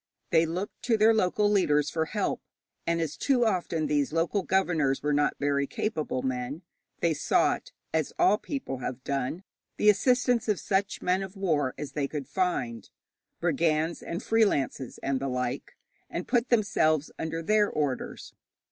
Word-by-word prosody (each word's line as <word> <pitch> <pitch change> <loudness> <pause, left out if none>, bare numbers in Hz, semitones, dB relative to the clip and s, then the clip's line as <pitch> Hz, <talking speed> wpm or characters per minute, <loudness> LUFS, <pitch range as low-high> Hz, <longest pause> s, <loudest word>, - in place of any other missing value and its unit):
They 160 0 +4
looked 180 +5 -4
to 235 -2 +3
their 220 +1 +5
local 210 0 +2
leaders 150 -8 +2
for 160 -1 0
help, 205 +4 -2 0.5
and, 170 0 +1
as 160 -2 -2
too 255 -4 +2
often 175 -6 0
these 145 -2 +1
local 165 +5 +1
governors 165 -8 +1
were 150 0 +1
not 145 0 +2
very 140 -1 +1
capable 155 - -2
men, 130 +5 -3 0.4
they 170 -1 +3
sought, 150 - +1 0.2
as 160 -2 0
all 205 +3 +4
people 265 - -4
have 130 0 -5
done, 140 +6 -2 0.3
the 210 - +6
assistance 245 +2 +2
of 210 -3 +1
such 200 +1 -1
men 185 +1 +2
of 190 +1 -7
war 150 -9 0
as 150 - -5
they 145 -2 -1
could 145 -2 -5
find 125 - -2 0.5
brigands, 160 0 +1
and 170 - -5
freelances, 170 - +1
and 135 -1 0
the 135 +1 -2
like 125 -1 -3 0.3
and 175 - -4
put 245 0 +1
themselves 160 - +2
under 165 +1 -3
their 210 +3 +3
orders. 145 -4 -3
165 Hz, 160 wpm, -28 LUFS, 145-200 Hz, 0.5 s, the